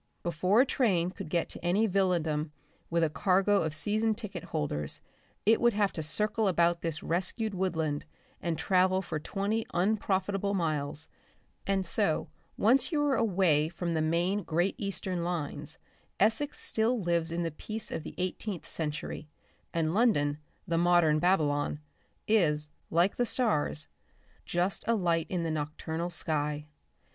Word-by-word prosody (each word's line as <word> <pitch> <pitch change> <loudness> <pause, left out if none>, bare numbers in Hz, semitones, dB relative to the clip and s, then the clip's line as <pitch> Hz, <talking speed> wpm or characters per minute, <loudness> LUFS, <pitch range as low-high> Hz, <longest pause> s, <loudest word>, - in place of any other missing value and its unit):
Before 180 +6 +3
a - - +4
train 185 -10 +1
could 160 - -8
get 170 0 0
to - - -7
any 185 +6 +3
villadom 170 -6 +1 0.4
with 170 0 +2
a 160 - +3
cargo 195 +6 +3
of 160 -1 -1
season 215 +5 +1
ticket 205 -6 -7
holders 75 -1 -3 0.5
it 225 +2 +4
would 240 -1 +4
have 205 -1 +1
to 160 - -4
circle 210 +7 +1
about 170 -2 +2
this 165 -2 -3
rescued 190 +5 -1
woodland 160 -6 -1 0.4
and 170 -2 -1
travel 185 +3 +2
for 155 - -3
twenty 205 +7 -1
unprofitable 200 +1 +1
miles, 155 -4 -2 0.6
and 195 -1 +1
so 170 -2 +1 0.3
once 255 - +3
you 305 - +1
are 290 -2 +2
away 175 -8 +2
from 170 0 -3
the 160 - +1
main 170 +6 +1
Great 175 +2 0
Eastern 190 -3 -2
lines 170 -4 -3 0.4
Essex 255 +7 +2
still 230 +2 +2
lives 170 -3 0
in 170 +1 -1
the 165 - -2
peace 215 +8 -6
of - - -3
the - - -9
eighteenth 185 0 -3
century, 150 -1 -4 0.4
and 165 -1 0
London, 155 -10 +2 0.3
the 165 0 +1
modern 175 -3 +4
Babylon, 150 -5 +1 0.5
is, 150 -8 +2 0.2
like 175 +4 +2
the 245 - +2
stars, 215 - +1 0.6
just 180 +3 0
a 230 - +3
light 170 -5 +1
in 180 -2 -1
the 165 - -1
nocturnal 155 +2 -3
sky. 150 -3 -1
175 Hz, 150 wpm, -30 LUFS, 160-200 Hz, 0.6 s, a